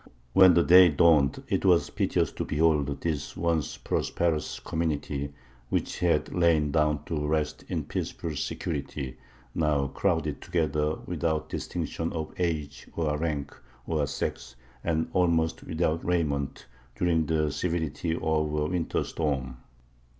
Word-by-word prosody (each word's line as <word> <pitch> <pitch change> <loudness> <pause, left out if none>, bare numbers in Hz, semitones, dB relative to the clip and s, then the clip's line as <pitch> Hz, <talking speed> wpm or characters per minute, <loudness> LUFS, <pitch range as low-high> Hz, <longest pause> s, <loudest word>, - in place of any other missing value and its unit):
When 95 -2 +7
the 85 - +5
day 90 +1 +8
dawned, 75 -2 +4
it - - 0
was - - +4
piteous - - +1
to - - -4
behold 75 -3 +1
this 75 -4 -3
once 85 -3 0
prosperous 85 -3 -1
community, 75 -3 -2 0.4
which - - -1
had - - +1
lain 80 -4 +3
down 75 -1 +1
to 75 -2 -2
rest 75 0 -1
in - - -2
peaceful 80 -2 -4
security, 70 -4 -4 0.4
now 75 -4 +1
crowded 80 -6 -1
together 75 -2 0
without 80 -1 -1
distinction 80 0 -3
of 80 -2 -4
age, 75 -5 -2
or 75 -3 0
rank, 75 -4 -2 0.3
or 75 -3 0
sex, 70 -2 -4 0.3
and 80 -1 0
almost 80 -3 +2
without 80 -1 -1
raiment, 75 -6 -1 0.3
during 80 0 +1
the 75 -2 +1
severity 80 0 -1
of - - -6 0.3
a 75 0 +1
winter 85 +1 -1
storm. 65 -5 -2
80 Hz, 130 wpm, -28 LUFS, 75-85 Hz, 0.4 s, day